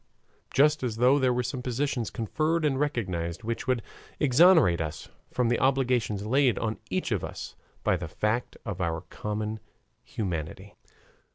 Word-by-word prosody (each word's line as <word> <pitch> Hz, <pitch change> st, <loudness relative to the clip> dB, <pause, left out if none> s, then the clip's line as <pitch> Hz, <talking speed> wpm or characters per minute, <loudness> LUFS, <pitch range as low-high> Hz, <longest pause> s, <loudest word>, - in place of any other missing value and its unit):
Just 150 Hz, +2 st, +4 dB
as 120 Hz, -4 st, -2 dB
though 125 Hz, +5 st, +4 dB
there 130 Hz, -2 st, +3 dB
were 125 Hz, 0 st, 0 dB
some 125 Hz, +2 st, -4 dB
positions 125 Hz, -1 st, -1 dB
conferred 155 Hz, +8 st, 0 dB
and 135 Hz, -3 st, +1 dB
recognized, 90 Hz, -, -2 dB
which 115 Hz, +1 st, -3 dB
would 125 Hz, -3 st, +1 dB, 0.4 s
exonerate 145 Hz, -, +5 dB
us 80 Hz, -1 st, -5 dB, 0.2 s
from 125 Hz, -2 st, +1 dB
the 120 Hz, -, +2 dB
obligations 125 Hz, -6 st, +1 dB
laid 130 Hz, +1 st, +3 dB
on 110 Hz, -1 st, -2 dB
each 185 Hz, -8 st, -1 dB
of 100 Hz, -6 st, 0 dB
us -, -, -6 dB, 0.3 s
by -, -, +3 dB
the 90 Hz, -1 st, -5 dB
fact 105 Hz, +9 st, -1 dB
of 100 Hz, -4 st, -4 dB
our 80 Hz, -2 st, -1 dB
common 105 Hz, +5 st, -4 dB, 0.4 s
humanity. 95 Hz, 0 st, -5 dB
115 Hz, 155 wpm, -28 LUFS, 100-135 Hz, 0.4 s, exonerate